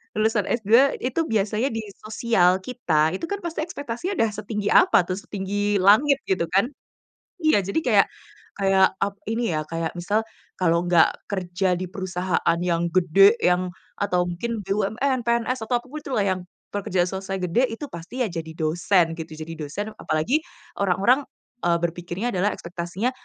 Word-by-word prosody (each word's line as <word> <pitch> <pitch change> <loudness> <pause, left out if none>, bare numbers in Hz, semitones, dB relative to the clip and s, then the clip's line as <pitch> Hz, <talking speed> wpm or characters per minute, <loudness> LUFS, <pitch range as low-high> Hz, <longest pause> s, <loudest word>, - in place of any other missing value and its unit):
lulusan 215 0 +2
S2 235 +4 +3
itu 255 +6 -2
biasanya 215 +4 +1
di 225 - -3 0.2
sosial 215 -4 +2
kita, 180 -8 0
itu - - -7
kan 405 - -1
pasti 335 -2 -3
ekspektasinya 300 +3 -4
udah 225 - +3
setinggi 210 0 -4
apa 360 - +5
tuh, 185 - -1
setinggi 205 0 -1
langit 255 +9 +5
gitu 190 -3 +1
kan. 195 +5 +3 0.8
Iya, 310 -10 +4
jadi 200 - +1
kayak - - +5 0.5
kayak 195 -1 +5 0.2
ap 200 0 -4 0.2
ini 225 -6 0
ya, 155 - 0
kayak 165 0 -3
misal, 205 +5 0 0.4
kalau 170 -1 +3
nggak 175 -2 +5 0.2
kerja 185 -1 0
di 185 - -3
perusahaan 185 -3 -1
yang 170 -1 0
gede 185 +3 +5
yang, 180 +1 +2 0.3
atau 180 -3 +1
mungkin 220 +7 -3
BUMN, 220 +7 0
PNS 235 +1 0
atau 245 0 +1
apa - - -19
pun 305 - -5
itulah 240 -8 -1
yang 185 -1 0 0.3
pekerja 185 -3 0
selesai 190 +1 -4
gede 180 +8 +2
itu 225 +6 -5
pasti 170 +9 -8
ya - - +1
jadi 165 -2 -5
dosen 165 +2 +2
gitu. 160 0 -7
Jadi 160 +1 -6
dosen 165 +8 -4
apalagi 240 - 0 0.4
orang-orang, 200 +8 +3 0.4
eee, 170 -1 +3
berpikirnya 175 +5 -3
adalah 190 +3 +2
ekspektasinya 175 +6 -3
195 Hz, 160 wpm, -24 LUFS, 175-230 Hz, 0.8 s, apa